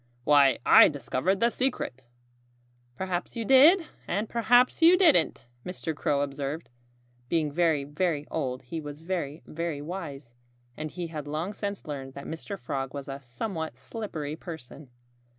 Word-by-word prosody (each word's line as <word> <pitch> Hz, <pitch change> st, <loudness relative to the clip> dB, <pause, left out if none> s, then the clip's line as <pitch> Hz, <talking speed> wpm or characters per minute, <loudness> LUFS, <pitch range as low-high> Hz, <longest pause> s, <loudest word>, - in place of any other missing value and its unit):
"Why, 140 Hz, -1 st, +5 dB
I -, -, +9 dB
discovered 145 Hz, +7 st, -1 dB
the 235 Hz, +1 st, +4 dB
secret!" 130 Hz, -, -2 dB, 0.9 s
"Perhaps 185 Hz, -, -3 dB
you 230 Hz, -1 st, -3 dB
did 310 Hz, -, +7 dB, 0.2 s
and 205 Hz, +4 st, -1 dB
perhaps 245 Hz, +5 st, +3 dB
you 340 Hz, +3 st, +8 dB
didn't," 180 Hz, -, +4 dB, 0.2 s
Mr. 175 Hz, -3 st, -4 dB
Crow 145 Hz, -1 st, 0 dB
observed. 140 Hz, +1 st, -4 dB, 0.6 s
Being 155 Hz, -3 st, +1 dB
very, 160 Hz, -2 st, +2 dB
very 150 Hz, +1 st, -1 dB
old, 130 Hz, -1 st, -2 dB
he 160 Hz, +6 st, -5 dB
was 145 Hz, 0 st, -8 dB
very, 165 Hz, -4 st, -4 dB
very 165 Hz, -2 st, -4 dB
wise. 145 Hz, -6 st, -7 dB, 0.4 s
And 155 Hz, 0 st, -5 dB
he 175 Hz, +1 st, -5 dB
had 150 Hz, -2 st, -5 dB
long 160 Hz, +7 st, -3 dB
since 200 Hz, -1 st, -5 dB
learned 135 Hz, -3 st, -6 dB
that 140 Hz, -, -8 dB
Mr. 180 Hz, +5 st, -6 dB
Frog 135 Hz, -1 st, -4 dB
was 140 Hz, -1 st, -6 dB
a 135 Hz, 0 st, -6 dB
somewhat 160 Hz, -, -5 dB
slippery 150 Hz, -, -5 dB
person. 155 Hz, -4 st, -10 dB
155 Hz, 150 wpm, -28 LUFS, 140-190 Hz, 0.9 s, I